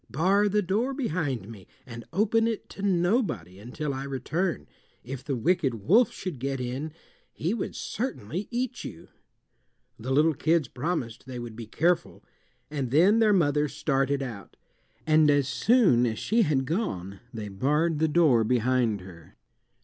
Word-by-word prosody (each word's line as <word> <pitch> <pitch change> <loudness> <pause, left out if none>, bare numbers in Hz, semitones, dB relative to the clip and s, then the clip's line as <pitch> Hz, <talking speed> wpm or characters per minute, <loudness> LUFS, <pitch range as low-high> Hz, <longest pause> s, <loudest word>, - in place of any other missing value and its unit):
Bar 195 +7 +2
the 210 +1 +1
door 225 +9 0
behind 155 - -2
me, 105 -5 -11 0.2
and 115 -3 -9
open 220 +4 +2
it 225 -2 -3
to - - -9
nobody 175 - 0
until 140 +7 -4
I 135 +1 -4
return. 145 +6 -2 0.4
If 130 +2 -7
the 140 - -2
wicked 135 0 +1
wolf 190 - +3
should 175 -9 -6
get 135 +1 -2
in 130 +5 -4 0.4
he 170 +6 -2
would 230 - -4
certainly 195 - -4
eat 245 0 -3
you." 80 - -9 0.9
The 120 +4 -6
little 155 +4 +4
kids 160 0 +1
promised 125 -4 -4
they 130 -1 -6
would 120 -2 -7
be 115 -1 -8
careful, 170 +8 0 0.5
and 140 -4 -2
then 180 - +5
their 220 -2 +4
mother 150 -6 +2
started 140 -1 0
out, 110 -8 -8 0.5
and 155 -1 +5
as 145 -2 +3
soon 175 - +4
as 110 -1 -2
she 230 - +1
had 145 -9 +1
gone 100 - -3
they 110 -3 -6
barred 150 +10 0
the 160 - +3
door 150 -8 +4
behind 120 -2 +1
her. 85 -3 -14
145 Hz, 155 wpm, -27 LUFS, 120-180 Hz, 0.9 s, then